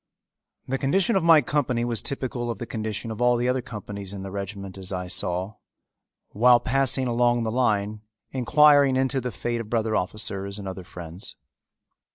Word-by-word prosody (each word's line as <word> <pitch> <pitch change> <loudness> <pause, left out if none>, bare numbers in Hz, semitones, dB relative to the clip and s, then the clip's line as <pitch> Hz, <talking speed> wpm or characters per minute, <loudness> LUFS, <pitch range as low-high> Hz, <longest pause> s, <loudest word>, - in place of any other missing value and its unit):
The 135 +1 -1
condition 190 - +2
of 190 - +2
my 165 -2 +7
company 125 -6 0
was 120 -2 -1
typical 125 -3 -3
of 115 - -3
the 120 - -5
condition 110 0 -4
of 110 - -6
all 125 0 +4
the 120 +1 0
other 130 0 +1
companies 100 -4 -7
in 95 -1 -6
the 95 - -6
regiment 100 -1 -6
as 95 -1 -7
I 90 -1 -3
saw, 90 +2 -3 0.7
while 120 +3 +5
passing 130 +1 +1
along 120 0 +2
the 110 - -1
line 105 -4 0 0.3
inquiring 140 +1 +5
into 130 0 +1
the 125 - -3
fate 120 +4 -3
of 110 - -9
brother 110 -2 0
officers 100 +1 -2
and 100 -2 -7
other 95 -1 -6
friends. 85 +1 -8
115 Hz, 180 wpm, -25 LUFS, 100-130 Hz, 0.7 s, my